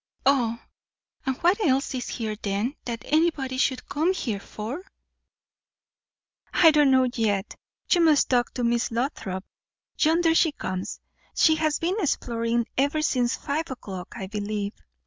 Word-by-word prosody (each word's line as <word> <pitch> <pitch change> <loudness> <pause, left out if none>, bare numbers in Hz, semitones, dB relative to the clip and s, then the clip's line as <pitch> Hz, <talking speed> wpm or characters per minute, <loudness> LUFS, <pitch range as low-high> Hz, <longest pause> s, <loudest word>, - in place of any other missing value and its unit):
"Ah! 240 -4 +2 0.6
And 265 -1 0
what 375 +5 +3
else 270 -4 +1
is 250 -2 -4
here 220 -3 -3
then, 205 +7 -1
that 230 -3 -4
anybody 290 -4 +1
should 260 -1 0
come 320 +6 +1
here 225 - -2
for?" 220 - -6 1.7
"I 325 -2 +6
don't 295 -2 +4
know 260 -1 +4
yet. 210 -4 -1 0.4
You 350 - +5
must 310 -5 +4
ask 245 0 +1
Miss 235 -1 +1
Lothrop. 225 -6 -3 0.5
Yonder 325 +1 +4
she 325 -2 +3
comes. 185 -7 -4 0.4
She 315 - +5
has 310 -1 +1
been 355 +5 -1
exploring 235 - 0
ever 285 +3 +1
since 250 -4 +1
five 310 +3 -3
o'clock, 195 -8 -7
I 205 -5 -5
believe." 205 +1 -3
260 Hz, 140 wpm, -25 LUFS, 225-310 Hz, 1.7 s, I